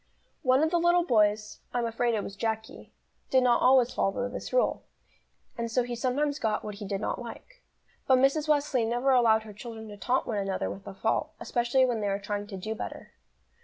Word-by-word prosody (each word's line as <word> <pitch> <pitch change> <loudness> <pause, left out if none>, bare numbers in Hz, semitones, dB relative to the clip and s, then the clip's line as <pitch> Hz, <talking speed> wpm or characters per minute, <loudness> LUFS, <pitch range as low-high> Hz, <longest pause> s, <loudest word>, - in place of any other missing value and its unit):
One 260 +3 +3
of 315 - +1
the 345 - +3
little 345 +1 +4
boys 210 -4 +2 0.2
I'm 240 -1 +1
afraid 230 +1 0
it 210 - -1
was 200 - -7
Jacky 220 +1 -4 0.4
did 260 -1 +4
not 245 -1 +3
always 255 -1 +5
follow 200 +5 0
this 250 - -7
rule, - - +1 0.8
and 230 0 -2
so 245 +2 +1
he 240 0 -4
sometimes 280 +5 0
got 215 -4 -1
what 210 - -5
he 205 - -5
did 195 0 -2
not 215 - -3
like. - - -10 0.5
But 260 - +6
Mrs. 275 +4 +2
Wesley 290 -5 +2
never 240 +4 +1
allowed 225 -4 +4
her 215 -1 -10
children 220 +1 -8
to 205 - -9
taunt 255 +5 0
one 215 -3 -2
another 195 -1 -2
with 195 - -10
a - - -7
fault, 220 +3 -1
especially 240 +2 +2
when 240 -3 -1
they 205 - -1
were 195 0 0
trying 205 0 -4
to 200 -2 -7
do 215 +4 -4
better. 220 - -7
235 Hz, 210 wpm, -28 LUFS, 210-260 Hz, 0.8 s, But